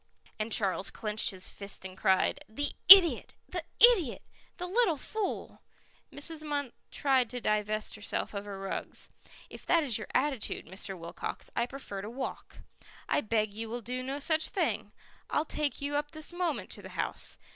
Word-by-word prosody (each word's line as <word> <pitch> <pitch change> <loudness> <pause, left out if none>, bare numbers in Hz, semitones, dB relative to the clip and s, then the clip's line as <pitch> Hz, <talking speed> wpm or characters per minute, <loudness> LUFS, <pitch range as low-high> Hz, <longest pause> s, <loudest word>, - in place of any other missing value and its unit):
And 215 +1 -3
Charles 195 -2 +2
clenched 215 +1 +1
his 185 -3 -3
fist 200 -1 -6
and 185 -1 -7
cried, 190 +10 +1
"The 285 +6 +1 0.2
idiot, 375 -3 +9
the 355 -2 -4 0.2
idiot, 420 - +7 0.3
the 360 - -4
little 370 -3 +2
fool!" 425 +8 -4 0.5
Mrs. 310 +2 -4
Munt 290 -4 -3 0.2
tried 260 -4 +2
to 250 - -5
divest 215 -1 -1
herself 210 0 -4
of 200 0 -5
her 200 -1 -7
rugs. 195 0 -6 0.4
"If - - -10
that 335 -2 +4
is 245 -6 +2
your 210 - -7
attitude, 265 -4 0
Mr. 190 0 -4
Wilcox, 170 0 -7
I 235 - +1
prefer 245 -7 -7
to 205 - -7
walk." 260 +3 -7 0.5
"I - - +1
beg 215 -3 0
you 225 +1 -6
will 240 +2 -4
do 250 +3 -4
no 265 +2 -4
such 315 +2 +1
thing. - - -1 0.4
I'll 305 - 0
take 300 -2 -2
you 290 0 -2
up 295 0 -2
this 310 +2 -3
moment 350 -4 -2
to - - -9
the - - -11
house. - - -2
255 Hz, 175 wpm, -30 LUFS, 210-300 Hz, 0.5 s, idiot